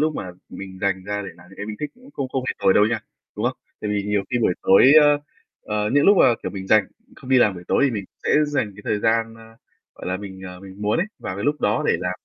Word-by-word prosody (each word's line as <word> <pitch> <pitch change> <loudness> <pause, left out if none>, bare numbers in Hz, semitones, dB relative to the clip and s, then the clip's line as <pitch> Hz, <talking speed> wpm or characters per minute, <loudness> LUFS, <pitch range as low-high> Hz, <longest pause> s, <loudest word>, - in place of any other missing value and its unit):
lúc 155 0 +1
mà 90 - -5 0.2
mình 95 -1 -9
dành 95 -1 -1
ra 105 +1 -3
để 100 - -7
làm 85 0 -17
những 95 - -15
cái 105 - -6
mình 105 0 -6
thích 150 - -3
cũng 255 +3 -18
không 135 - -4
không 130 -1 -3
hề - - +1
tồi 95 - +4
đâu 105 - +5
nha 115 0 -1 0.4
đúng 105 - -3
không? 125 - -2 0.2
Tại 105 - -3
vì 105 -1 0
nhiều 105 0 0
khi 125 - +1
buổi 110 -6 +2
tối 125 +8 +6
ơ, 145 0 +4 0.4
ờ, 105 0 -2
những 145 0 +4
lúc 200 - +7
mà, 120 -9 +5
kiểu, - - -3
mình 95 -1 -7
rảnh, 105 -1 +4 0.3
không 130 - -11
đi 130 - +6
làm 105 -5 +3
buổi 90 -1 -10
tối 140 - +3
thì 135 - +2
mình 105 -4 -4 0.2
sẽ - - 0 0.2
dành 145 -8 -1
cái 105 - -13
thời 105 - -1
gian, 115 0 +1
ơ, 115 - -15 0.5
gọi - - -10
là 95 - -1
mình, 95 -1 -9
ờ, 90 -1 -9
mình 95 +1 -11
muốn 105 +1 +1
ấy 185 - +1
vào 95 - -5
cái 100 - -4
lúc 150 +2 0
đó 105 +2 +1
để - - +3
làm 90 0 -1
105 Hz, 295 wpm, -22 LUFS, 95-130 Hz, 0.5 s, lúc